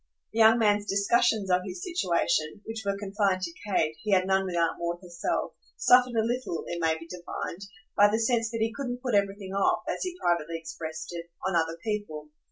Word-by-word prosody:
The 225 - -2
young 225 +1 +7
man's 210 -2 +2
discussions 200 0 +2
of 180 0 +4
his 185 -1 -6
situation 185 - 0
which 225 0 -5
were 200 0 -1
confined 200 -2 0
to 170 -2 -3
Kate; 160 -6 +1
he 210 -2 0
had 185 -1 +4
none 190 0 +2
with 180 - -3
Aunt 165 -1 +1
Maud 170 0 -2
herself 175 -2 -3 0.2
suffered 250 -1 +5
a 220 - +3
little, 240 -8 -2
it 170 - -4
may 160 -1 +2
be 165 - -10
divined, 175 +1 -6 0.3
by 205 0 +6
the 215 - +1
sense 230 0 +1
that 230 -1 -4
he 225 0 +1
couldn't 250 -2 -4
put 250 -3 -1
everything 200 -1 0
off, 195 0 +2
as - - -2
he 365 -1 -3
privately 170 -1 0
expressed 160 -1 -7
it, 170 0 -7 0.2
on 190 - 0
other 165 0 +1
people. 205 -9 -4
195 Hz, 205 wpm, -28 LUFS, 170-220 Hz, 0.3 s, young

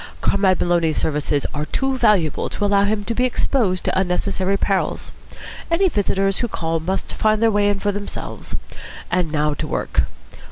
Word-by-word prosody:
Comrade 195 -2 +2
Maloney's 170 -3 +2
services 145 -1 0
are 150 0 -3
too 270 0 0
valuable 195 - +2
to 205 - -2
allow 200 0 +3
him 205 0 0
to 230 - -2
be 245 - 0
exposed 235 -6 +1
to - - +1
unnecessary 190 +1 0
perils. 195 -1 -1 0.6
Any 365 +3 +3
visitors 195 - 0
who 240 - 0
call 165 -6 -2
must 185 +4 -3
find 215 0 +2
their 225 0 +4
way 205 0 +3
in 200 -1 0
for 205 +1 0
themselves. 205 0 -6 0.6
And 175 -3 +1
now 150 -1 +1
to - - -4
work. - - 0
195 Hz, 170 wpm, -21 LUFS, 175-210 Hz, 0.6 s, their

